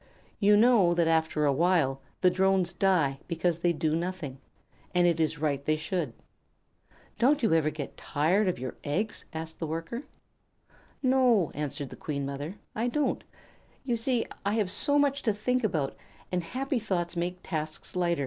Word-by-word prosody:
You 205 0 +5
know 210 -7 +5
that 170 -1 +3
after 160 -2 +2
a 140 - +3
while 150 -4 +2 0.2
the 180 - +5
Drones 190 -1 +2
die 165 -8 +2
because 170 0 0
they 175 0 +2
do 155 -1 0
nothing, 170 -6 -4 0.6
and 175 0 +5
it 170 -2 +2
is 160 0 +1
right 145 -2 -1
they 155 +2 +2
should." 160 - -2 1.1
"Don't 280 +3 +3
you 220 - +3
ever 160 -2 +3
get 150 -2 -6
tired 180 +8 +1
of 180 - 0
your 130 +1 -5
eggs?" 200 +10 -2
asked 160 -1 -6
the 165 - -2
Worker. 165 - -4 1.0
"No," 255 - +4
answered 145 -2 -4
the - - -7
Queen 140 -2 -2
Mother, 145 +6 -5 0.2
"I 230 +3 -1
don't. 295 +4 0 0.6
You 245 -3 0
see, 235 +1 +1 0.2
I 200 +2 0
have 205 -5 +1
so 285 +7 +3
much 285 -1 +2
to 220 - +1
think 250 +4 0
about, 155 -10 0 0.4
and 180 -1 0
happy 260 - -2
thoughts 180 -5 -2
make 175 +1 -2
tasks 155 -1 -4
light. 175 -1 +1
175 Hz, 170 wpm, -29 LUFS, 155-210 Hz, 1.1 s, You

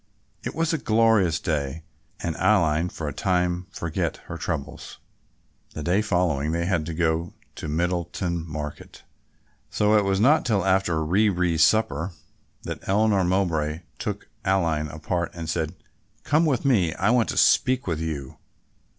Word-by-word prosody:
It - - -5
was 165 0 0
a 160 - 0
glorious 110 -9 +3
day 75 -1 -2 0.4
and 85 -2 -2
Aline 85 -5 +2
for 80 - -6
a 75 - -3
time 90 -1 0
forgot 85 -4 -3
her - - -7
troubles. - - -5 0.8
The 75 - -4
day 90 +6 +2
following 85 -7 0
they 85 0 0
had 85 -4 0
to 80 - -4
go 80 -1 +1
in 85 - -10 0.2
to - - -5
Middleton 85 +1 -1
Market, 75 -1 -7 0.7
so 105 +1 +2
it 105 - +4
was 95 -1 +1
not 140 +9 +4
till 105 -6 +1
after 95 -4 +1
rere 90 -1 +2
supper 95 -2 +2 0.5
that - - -5
Eleanor 100 -1 +3
Mowbray 85 -4 0 0.2
took 105 -1 -4 0.2
Aline 85 -6 +1
apart 80 +3 -3
and 85 -2 -6
said, 80 +1 -2 0.5
"Come 155 +3 +3
with 140 -2 0
me, 95 -12 +2
I 100 +4 +2
want 120 -2 +2
to - - -3
speak 130 0 +3
with 80 -4 -2
you." 75 -5 -5
90 Hz, 155 wpm, -25 LUFS, 80-100 Hz, 0.8 s, it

